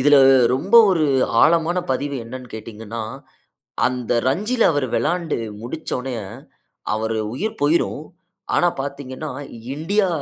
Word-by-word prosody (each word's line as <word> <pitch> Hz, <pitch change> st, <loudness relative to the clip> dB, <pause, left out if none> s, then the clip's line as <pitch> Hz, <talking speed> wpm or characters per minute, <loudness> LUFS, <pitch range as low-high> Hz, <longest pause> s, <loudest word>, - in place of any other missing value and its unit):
இதில 145 Hz, +2 st, +6 dB, 0.4 s
ரொம்ப 155 Hz, -, -1 dB, 0.2 s
ஒரு 170 Hz, -4 st, +2 dB, 0.4 s
ஆழமான 165 Hz, +2 st, +3 dB
பதிவு 140 Hz, +2 st, -1 dB
என்னன்னு 125 Hz, +2 st, -9 dB
கேட்டீங்கன்னா, 110 Hz, +1 st, -7 dB, 0.9 s
அந்த 125 Hz, -2 st, -2 dB
ரஞ்சில, 210 Hz, -, +1 dB
அவரு 145 Hz, -3 st, 0 dB
விளையாண்டு 165 Hz, +6 st, 0 dB, 0.2 s
முடிச்ச 125 Hz, +8 st, -6 dB
உடனேய, 125 Hz, -2 st, -4 dB, 0.7 s
அவரு 110 Hz, +1 st, -1 dB, 0.2 s
உயிர் 215 Hz, -, -3 dB
போயிரும். 150 Hz, 0 st, +1 dB, 0.5 s
ஆனா, 175 Hz, -, +4 dB
பார்த்தீங்கனா 140 Hz, +1 st, -6 dB, 0.4 s
இண்டியா 190 Hz, +7 st, +1 dB
145 Hz, 110 wpm, -21 LUFS, 125-170 Hz, 0.9 s, இதில